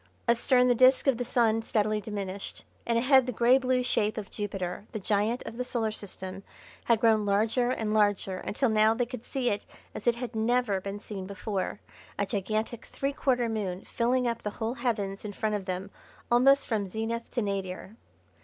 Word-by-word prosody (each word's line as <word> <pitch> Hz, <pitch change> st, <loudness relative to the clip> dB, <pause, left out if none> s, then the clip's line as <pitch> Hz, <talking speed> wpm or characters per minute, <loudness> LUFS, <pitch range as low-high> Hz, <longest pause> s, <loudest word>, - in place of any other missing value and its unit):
Astern 250 Hz, +2 st, +4 dB
the 245 Hz, -, +5 dB
disc 255 Hz, +2 st, +5 dB
of 265 Hz, -4 st, +2 dB
the -, -, 0 dB
Sun 230 Hz, -2 st, +2 dB
steadily 215 Hz, -1 st, 0 dB
diminished 200 Hz, -2 st, -6 dB, 0.2 s
and 235 Hz, -1 st, +2 dB
ahead 260 Hz, +1 st, +5 dB
the -, -, 0 dB
grey 245 Hz, +3 st, +4 dB
blue 255 Hz, -1 st, +1 dB
shape 215 Hz, -3 st, +1 dB
of 210 Hz, -3 st, -6 dB
Jupiter, 195 Hz, -1 st, -4 dB
the -, -, -2 dB
Giant 210 Hz, +4 st, 0 dB
of 230 Hz, -, -7 dB
the 250 Hz, -, -1 dB
Solar 235 Hz, -3 st, -1 dB
System, 190 Hz, -2 st, -6 dB, 0.4 s
had 235 Hz, -2 st, +3 dB
grown 220 Hz, -2 st, +4 dB
larger 220 Hz, +5 st, +2 dB
and 220 Hz, -4 st, -1 dB
larger 205 Hz, -3 st, +2 dB
until 265 Hz, +5 st, 0 dB
now 220 Hz, +1 st, +4 dB
they 245 Hz, +1 st, +1 dB
could 250 Hz, -1 st, -9 dB
see 255 Hz, -3 st, 0 dB
it 205 Hz, -, -2 dB, 0.3 s
as 215 Hz, -, -7 dB
it 235 Hz, -, +4 dB
had 245 Hz, -1 st, -6 dB
never 220 Hz, -3 st, +1 dB
been 200 Hz, +2 st, -5 dB
seen 195 Hz, -3 st, -7 dB
before 200 Hz, 0 st, -3 dB, 0.4 s
a 200 Hz, -, +1 dB
gigantic 215 Hz, +4 st, -2 dB
three 275 Hz, +1 st, -2 dB
quarter 250 Hz, -4 st, +1 dB
moon 200 Hz, -5 st, -3 dB
filling 250 Hz, +1 st, 0 dB
up 235 Hz, -1 st, -2 dB
the 210 Hz, -, -2 dB
whole 225 Hz, +1 st, -1 dB
heavens 205 Hz, -7 st, -2 dB
in 210 Hz, -1 st, -5 dB
front 215 Hz, +1 st, -1 dB
of 205 Hz, -2 st, -2 dB
them 185 Hz, +2 st, -4 dB, 0.4 s
almost 275 Hz, +3 st, +5 dB
from 210 Hz, -4 st, -1 dB
zenith 225 Hz, +4 st, -3 dB
to 240 Hz, -, -1 dB
nadir. 195 Hz, 0 st, -4 dB
220 Hz, 190 wpm, -28 LUFS, 205-245 Hz, 0.4 s, the